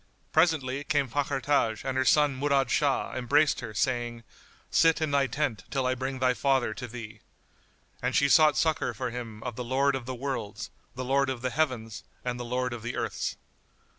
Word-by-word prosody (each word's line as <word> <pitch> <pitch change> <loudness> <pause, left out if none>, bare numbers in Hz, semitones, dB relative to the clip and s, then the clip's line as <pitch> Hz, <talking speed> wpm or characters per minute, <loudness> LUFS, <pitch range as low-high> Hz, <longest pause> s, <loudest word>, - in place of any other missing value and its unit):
Presently 145 -5 +2
came 145 -2 +1
Fakhr 140 +2 -1
Taj, 115 -6 +1
and 130 -1 -1
her 130 0 +1
son 145 0 +4
Murad 135 -1 +1
Shah 140 -3 +1
embraced 145 +4 +2
her - - -6
saying, 120 0 -1 0.5
"Sit 165 0 +4
in 155 -2 -1
thy 140 -1 +3
tent 135 -6 -2
till 135 -3 -1
I 130 - +2
bring 130 +1 -3
thy 130 0 +2
father 130 -4 +1
to 125 +2 -6
thee." 110 -2 -9 0.8
And 125 +1 -1
she 140 - +4
sought 155 +1 +5
succour 160 -2 +1
for 125 -3 -3
him 115 -3 -7
of 125 -3 -4
the 125 - -3
Lord 135 +3 +2
of 130 -2 -4
the 130 - -3
Worlds, 130 -5 -4 0.2
the 130 0 -4
Lord 135 +1 +2
of 130 -2 -4
the 130 - 0
heavens 120 -6 -1 0.2
and 125 0 -2
the - - -3
Lord 125 +1 -1
of 120 - -6
the 120 +2 -4
earths. - - -2
130 Hz, 195 wpm, -28 LUFS, 120-140 Hz, 0.8 s, sought